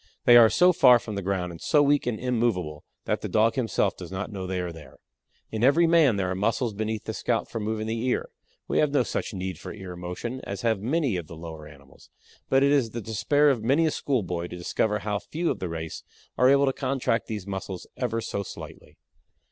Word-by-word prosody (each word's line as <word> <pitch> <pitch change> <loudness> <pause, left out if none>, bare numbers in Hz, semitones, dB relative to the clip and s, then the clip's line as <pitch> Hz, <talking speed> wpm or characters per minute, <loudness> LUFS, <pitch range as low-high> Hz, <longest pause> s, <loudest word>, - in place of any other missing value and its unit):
They 120 - +8
are 115 -2 +9
so 180 +7 +5
far 125 -6 +7
from 110 -2 -7
the 100 - -3
ground 95 -2 -2
and 85 - -11
so 150 -1 +3
weak 145 -2 +2
and 110 -3 -1
immovable 110 -12 -1 0.2
that - - -1
the - - -4
Dog 110 +1 +3
himself 115 -6 0
does - - -9
not 95 +4 -4
know 95 -2 -5
they 95 0 -2
are 90 -1 -3
there. 75 -5 -13 0.5
In 110 0 -2
every 145 +6 +5
man 165 -8 +4
there 95 -2 -1
are - - 0
muscles 110 +4 0
beneath 110 +1 -3
the 110 - -4
scalp 115 +1 -1
for 115 - -5
moving 110 0 -2
the 115 +1 -2
ear. 125 - -1 0.4
We - - +1
have 150 - +3
no 140 - +4
such - - -3
need 95 -3 -5
for - - -8
ear 95 -3 -8
motion 90 +9 -5
as 100 +1 -6
have 110 -3 +1
many 135 - 0
of 85 -3 -6
the 80 - -10
lower 80 -2 -9
animals, 70 -2 -17 0.4
but 135 +1 +4
it 140 - +4
is 135 -6 +3
the 120 - -5
despair 145 +8 +2
of 120 -5 -2
many 140 +8 +3
a 155 - +2
school 130 -7 -1
boy 85 -1 -3
to 90 - -8
discover 105 +4 0
how 105 -1 -2
few 165 +8 -2
of - - -4
the 90 - -3
race 80 -1 -5 0.3
are 125 - +4
able 140 +1 +5
to 135 - +1
contract 130 -4 -1
these 105 -4 -5
muscles 95 -2 -5
ever 115 -2 -2
so 100 - -3
slightly. 100 - -10
110 Hz, 235 wpm, -26 LUFS, 95-130 Hz, 0.5 s, are